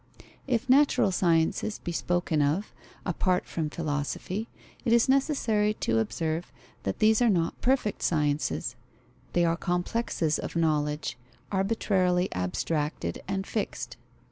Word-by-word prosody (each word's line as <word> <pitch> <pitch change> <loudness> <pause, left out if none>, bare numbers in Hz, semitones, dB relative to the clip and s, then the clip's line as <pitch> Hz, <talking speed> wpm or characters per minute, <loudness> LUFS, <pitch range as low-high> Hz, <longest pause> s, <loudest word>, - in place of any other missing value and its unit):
If 250 -1 0
natural 270 -6 +4
sciences 170 +3 +1
be 175 - -5
spoken 175 -2 0
of, 155 +9 0 0.3
apart 180 0 +1
from 160 -2 -3
philosophy, 155 +7 -3 0.3
it 235 - +2
is 235 -1 +5
necessary 245 -6 +2
to 110 - +1
observe 160 +9 -2 0.3
that 95 - -2
these 220 +2 +4
are 240 - +5
not 170 -5 0
perfect 255 -5 +1
sciences: 145 -5 0 0.6
they 175 -1 +3
are 165 0 +2
complexes 175 -2 -1
of - - -5
knowledge, 150 -5 0 0.3
arbitrarily 190 -3 +1
abstracted 95 - -2
and 195 0 -2
fixed. 215 0 -3
175 Hz, 120 wpm, -28 LUFS, 155-215 Hz, 0.6 s, is